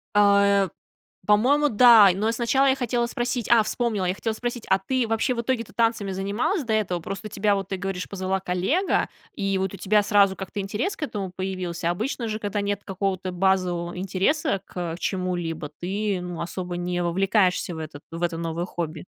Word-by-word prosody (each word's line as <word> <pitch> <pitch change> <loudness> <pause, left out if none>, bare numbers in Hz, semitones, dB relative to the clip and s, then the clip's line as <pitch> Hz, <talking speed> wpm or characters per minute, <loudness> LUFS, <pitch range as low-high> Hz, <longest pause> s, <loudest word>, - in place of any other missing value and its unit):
А, 200 -1 +5
э, - - -15 0.6
по-моему, 265 +8 +4
да. 225 -3 +8
Но 210 +4 0
и - - +2
сначала 240 +4 +2
я 265 - +4
хотела 245 -2 0
спросить, 240 -1 -2
а, 235 -2 +6
вспомнила, 215 -3 -1
я 180 - +1
хотела 225 +2 -2
спросить, 240 +1 -4
а 190 - +4
ты 250 +4 -1
вообще 225 +3 +1
в 235 - -1
итоге-то 235 -2 -2
танцами 225 -4 +1
занималась 200 - -1
до 230 -3 -1
этого? 200 -5 0
Просто 195 +5 -6
тебя, 205 0 +1
вот 195 -1 -4
ты 195 - -2
говоришь, 190 -1 -4
позвала 190 -1 -2
коллега, 190 - 0 0.3
и 195 -1 0
вот 190 0 -2
у - - -7
тебя 210 +2 +3
сразу 200 -2 +4
как-то 190 +2 -6
интерес 210 - -2
к 320 - -6
этому 205 -9 -4
появился. 180 -3 -3
Обычно 230 +6 -2
же, 215 0 -3
когда 205 -1 -2
нет 200 0 -2
какого-то 190 -1 -2
базового 180 -2 0
интереса 195 - 0
к 175 -2 -4
чему-либо, 175 -5 -2
ты, 200 +2 -1
ну, 180 -1 -5
особо 180 0 -4
не 175 0 -2
вовлекаешься 185 0 +1
в - - -7
этот 155 -2 -7
в 165 +1 -6
это 170 -1 0
новое 165 +1 -3
хобби. 165 -2 -5
195 Hz, 190 wpm, -24 LUFS, 180-225 Hz, 0.6 s, да